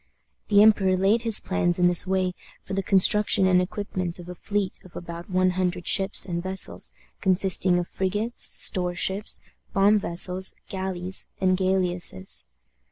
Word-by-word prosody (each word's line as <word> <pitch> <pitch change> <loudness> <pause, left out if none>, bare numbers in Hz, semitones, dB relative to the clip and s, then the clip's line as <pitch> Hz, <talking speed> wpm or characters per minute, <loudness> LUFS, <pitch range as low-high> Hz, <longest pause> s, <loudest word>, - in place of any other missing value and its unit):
The 205 0 +5
emperor 195 -4 +3
laid 200 +5 +2
his 225 -2 +5
plans 175 -2 -1
in 180 - +2
this 175 +1 +4
way 185 -1 -1 0.3
for - - -8
the 195 - -1
construction 195 +1 +4
and 180 -1 +3
equipment 185 -2 -5
of 175 -1 -12
a - - -6
fleet 200 +2 -3
of 185 - -18
about 170 0 -9
one 185 0 +1
hundred 180 -1 -3
ships 195 -1 0
and 170 -2 -4
vessels, 190 +1 -2 0.3
consisting 185 -1 +2
of 175 -1 -3
frigates, 205 +5 -3 0.2
store 180 -2 +1
ships, 190 +3 -2 0.3
bomb 205 +2 +3
vessels, 185 +1 -2
galleys, 190 -1 -2
and 185 -1 +2
galliasses. 180 - -1
185 Hz, 155 wpm, -24 LUFS, 180-195 Hz, 0.3 s, The